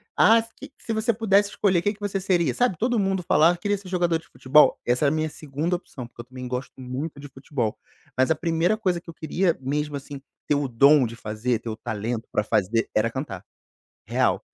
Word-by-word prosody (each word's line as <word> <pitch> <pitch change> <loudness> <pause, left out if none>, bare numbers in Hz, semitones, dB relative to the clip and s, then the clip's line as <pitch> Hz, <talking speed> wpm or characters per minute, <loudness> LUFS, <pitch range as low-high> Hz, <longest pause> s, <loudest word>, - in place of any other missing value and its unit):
"Ah 225 +1 +6
se 225 - -12
que 280 +1 -11
se 225 - -4
você 220 +2 +1
pudesse 205 -2 +3
escolher, 190 -4 +1
que 205 +4 0
que 210 - -20
você 205 -2 -2
seria?", 175 -8 +1
sabe. 245 -8 +1
Todo 240 +4 +1
mundo 195 -1 0
falava 165 +2 +4
"Queria 205 +2 -1
ser 190 -1 -11
jogador 175 -2 +1
de - - -20
futebol.", 150 +4 +4
essa 125 +4 +2
era - - +3
a - - 0
minha 155 0 -1
segunda 155 +3 -3
opção, 135 -8 -8
porque 120 - -11
eu - - -14
também 130 0 -8
gosto 125 +1 -4
muito 130 +4 -5
de 145 - -9
futebol, 135 -4 -3 0.4
mas 130 +4 +3
a - - +4
primeira 165 +5 +1
coisa 185 -5 0
que 170 - -14
eu - - -7
queria 165 +2 0
mesmo, 145 +2 -2
assim, 140 0 -9 0.3
ter 150 - +3
o 145 -1 0
dom 140 +3 +5
de 115 0 -6
fazer, 110 +2 -2
ter 115 - -7
o 110 - -4
talento 110 +1 -4
pra 105 - +1
fazer 110 +1 +1
era 110 +2 +3
cantar, 125 -8 -5 0.6
real. - - +1
150 Hz, 225 wpm, -24 LUFS, 125-185 Hz, 0.6 s, Ah